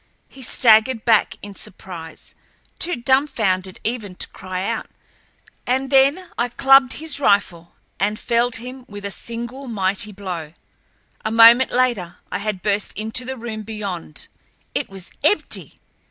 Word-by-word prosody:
He 270 - -15
staggered 225 -1 +4
back 225 -3 +3
in 205 0 -8
surprise, 170 -4 -9 0.5
too 355 - 0
dumbfounded 225 -8 +1
even 215 -5 -3
to - - -2
cry 185 0 -5
out, 230 +2 -2 0.8
and 260 +2 0
then 280 +7 +3
I 240 +1 +1
clubbed 270 +1 +5
his 310 -2 -1
rifle 185 -9 +1 0.2
and 210 +2 0
felled 240 0 +1
him 250 +2 -6
with 205 -1 -9
a 200 - -3
single 235 +6 -6
mighty 200 -1 -1
blow. 180 -6 -6 0.7
A - - -1
moment 230 +3 +7
later, 235 -9 0
I - - -2
had 200 -3 -3
burst 205 0 0
into 220 +4 -2
the 265 +1 -5
room 225 -2 -5
beyond. 205 - -6 0.5
It - - -2
was 195 -2 -9
empty! 410 +8 +1
220 Hz, 140 wpm, -21 LUFS, 195-255 Hz, 0.8 s, moment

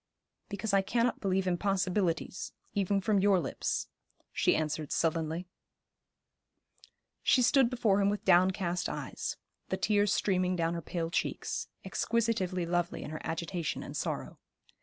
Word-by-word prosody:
'Because 200 +1 -3
I 195 - +5
cannot 235 +4 +1
believe 190 -1 +1
impossibilities, 185 -1 0 0.2
even 200 0 +1
from 205 0 +2
your 195 -1 +4
lips,' - - -2 0.5
she - - +3
answered 155 -1 -2
sullenly. 165 +1 0 1.8
She 255 - +4
stood 265 0 +5
before 220 -5 +2
him 200 - +3
with 205 0 -3
downcast 180 0 +3
eyes, - - -4 0.3
the - - 0
tears 205 -1 +2
streaming 185 -3 +1
down 165 -1 0
her 170 - -3
pale 165 0 -3
cheeks, - - -2 0.2
exquisitively 195 -6 0
lovely 175 0 -1
in - - -7
her 155 - -5
agitation 165 0 -3
and - - -8
sorrow. - - -3
185 Hz, 135 wpm, -31 LUFS, 170-205 Hz, 1.8 s, I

